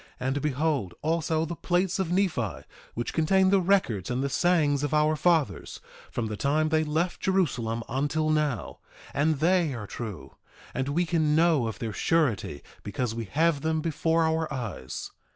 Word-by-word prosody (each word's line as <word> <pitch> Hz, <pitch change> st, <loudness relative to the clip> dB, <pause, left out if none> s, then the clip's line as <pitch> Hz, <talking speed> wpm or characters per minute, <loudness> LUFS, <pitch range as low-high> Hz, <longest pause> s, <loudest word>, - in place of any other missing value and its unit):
And 135 Hz, +3 st, -1 dB
behold, 140 Hz, -, -1 dB
also 160 Hz, 0 st, 0 dB
the 170 Hz, +1 st, -5 dB
plates 180 Hz, +2 st, 0 dB
of 180 Hz, -3 st, -1 dB
Nephi, 165 Hz, -, 0 dB, 0.3 s
which 120 Hz, -, -3 dB
contain 190 Hz, +4 st, +3 dB
the 195 Hz, -1 st, +4 dB
records 170 Hz, -, +1 dB
and 125 Hz, +2 st, -1 dB
the 140 Hz, -, 0 dB
sayings 150 Hz, -3 st, +2 dB
of 145 Hz, +1 st, 0 dB
our 150 Hz, +1 st, +3 dB
fathers 165 Hz, -2 st, +1 dB, 0.3 s
from 120 Hz, -, -3 dB
the 110 Hz, -1 st, -3 dB
time 150 Hz, +7 st, +1 dB
they 155 Hz, 0 st, +2 dB
left 160 Hz, +4 st, -1 dB
Jerusalem 125 Hz, -12 st, 0 dB
until 145 Hz, +4 st, 0 dB
now, 150 Hz, -7 st, -1 dB, 0.3 s
and 155 Hz, +2 st, +2 dB
they 165 Hz, -1 st, +2 dB
are 110 Hz, -3 st, -6 dB
true; 100 Hz, -, -7 dB, 0.4 s
and 130 Hz, +2 st, -2 dB
we 170 Hz, +5 st, +1 dB
can 155 Hz, -3 st, +1 dB
know 160 Hz, -7 st, +3 dB
of 110 Hz, -, -5 dB
their 110 Hz, -2 st, -4 dB
surety 110 Hz, -, 0 dB, 0.2 s
because 110 Hz, +3 st, -3 dB
we 115 Hz, 0 st, -4 dB
have 155 Hz, -, +1 dB
them 160 Hz, +1 st, 0 dB
before 160 Hz, +1 st, +1 dB
our 160 Hz, 0 st, 0 dB
eyes. 115 Hz, -, -5 dB
150 Hz, 170 wpm, -27 LUFS, 125-165 Hz, 0.4 s, the